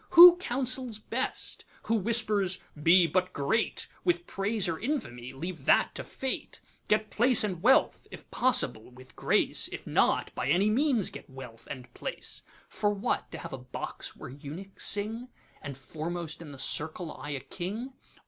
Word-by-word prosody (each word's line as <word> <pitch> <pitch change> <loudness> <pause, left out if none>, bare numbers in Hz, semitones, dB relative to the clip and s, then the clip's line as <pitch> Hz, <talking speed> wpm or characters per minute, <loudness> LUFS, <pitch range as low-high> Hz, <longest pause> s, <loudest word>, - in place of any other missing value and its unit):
Who 350 0 +12
counsels 255 - -1
best? 235 +4 -3 0.2
who 225 - -1
whispers, 210 -4 +2 0.2
'Be 170 +3 +6
but 185 +3 0
great, 145 +11 0 0.2
With 350 0 +1
praise 200 0 -1
or 165 -2 -2
infamy—leave 160 - -4
that - - +4
to - - -5
Fate; 265 -1 -3 0.3
Get 215 0 +1
Place 245 +1 +4
and 185 -5 -2
Wealth, 260 +6 +3
if - - -11
possible 245 - +1
with 130 +1 -16
grace; - - +2
If - - -7
not, - - +2
by - - -3
any 190 +7 +3
means 250 - +2
get - - -10
Wealth 125 -4 -11
and 125 -2 -8
Place:'(For 205 - -4
what? 205 +4 -1
to - - -6
have - - -8
a 135 - -5
Box 125 0 -6
where - - -9
eunuchs 155 +8 -5
sing, 220 +5 +1 0.3
And 140 -3 -7
foremost 160 +4 -5
in 155 -3 -9
the 140 - -10
circle 160 +4 -1
eye 145 - -7
a - - -5
King?) 195 - -6
190 Hz, 160 wpm, -29 LUFS, 145-230 Hz, 0.3 s, Who